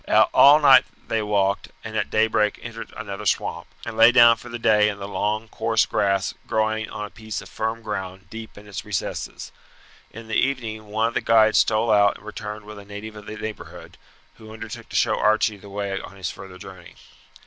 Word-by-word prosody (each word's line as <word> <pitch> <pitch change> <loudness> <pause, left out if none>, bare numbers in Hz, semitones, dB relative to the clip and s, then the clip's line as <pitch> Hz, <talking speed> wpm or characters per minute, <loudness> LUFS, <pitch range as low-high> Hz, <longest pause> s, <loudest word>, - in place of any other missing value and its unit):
All 145 +2 +8
night 135 -3 +7 0.2
they 115 - 0
walked, 100 -2 0
and - - -7
at - - -1
daybreak 110 -1 +2
entered 115 -1 -8
another 105 -1 -5
swamp, - - -1 0.2
and 115 - -6
lay 115 +1 +7
down 120 -2 +7
for 120 - -12
the 120 - -5
day 105 -2 +4
in 100 - -5
the 100 -1 -6
long 105 +3 -2
coarse - - +1
grass 100 -1 0
growing 110 0 0
on 105 -1 -5
a 105 - -11
piece 110 -1 -6
of - - -11
firm 110 +1 -3
ground 95 -3 -6
deep 110 -1 -9
in 105 +1 -13
its 100 -1 -6
recesses. 105 -3 -4 0.6
In 115 +1 -11
the 110 - -6
evening 110 -5 -1
one 110 +2 0
of - - -11
the - - 0
guides 110 -1 +4
stole 110 +1 +2
out 100 -1 +4
and 105 - -19
returned 105 0 -7
with 105 -1 -10
a 100 - -13
native 105 +2 -8
of 105 -1 -11
the 110 - -7
neighbourhood, 110 -1 -8 0.4
who 110 0 -13
undertook 110 0 -9
to - - -9
show - - +2
Archie 110 0 +2
the 100 +1 -14
way 100 -1 -3
on 100 - -11
his 95 - -4
further 95 -1 -11
journey. 95 -1 -12
110 Hz, 205 wpm, -23 LUFS, 100-110 Hz, 0.6 s, All